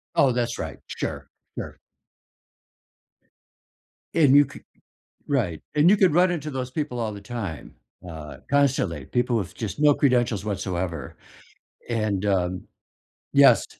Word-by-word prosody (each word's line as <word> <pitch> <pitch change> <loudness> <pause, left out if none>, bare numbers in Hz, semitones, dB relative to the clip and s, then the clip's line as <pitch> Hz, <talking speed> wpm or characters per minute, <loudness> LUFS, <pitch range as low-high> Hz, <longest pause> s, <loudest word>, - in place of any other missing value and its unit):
Oh, 135 -2 +5
that's 120 -1 -1
right, - - -5
sure, - - -5 0.3
sure. - - -6 2.4
And 145 -4 +5
you 145 0 +7
could - - -13 0.6
Right, 110 - -1
and 150 +3 +5
you 205 - +6
could 190 -5 +4
run 180 +3 +4
into 155 -4 -3
those 130 -2 -4
people 125 -3 -3
all 110 -2 -2
the 100 - -8
time, 100 - -6 0.3
uh, 80 -3 -8
constantly, 125 - +1
people 120 - 0
with 95 -4 -5
just 110 +5 -5
no 150 -1 +6
credentials 120 -8 +1
whatsoever, 95 -5 -3 0.7
and, 110 -4 -1
um, 90 -2 0 0.7
yes. - - +6
120 Hz, 130 wpm, -24 LUFS, 95-140 Hz, 2.4 s, you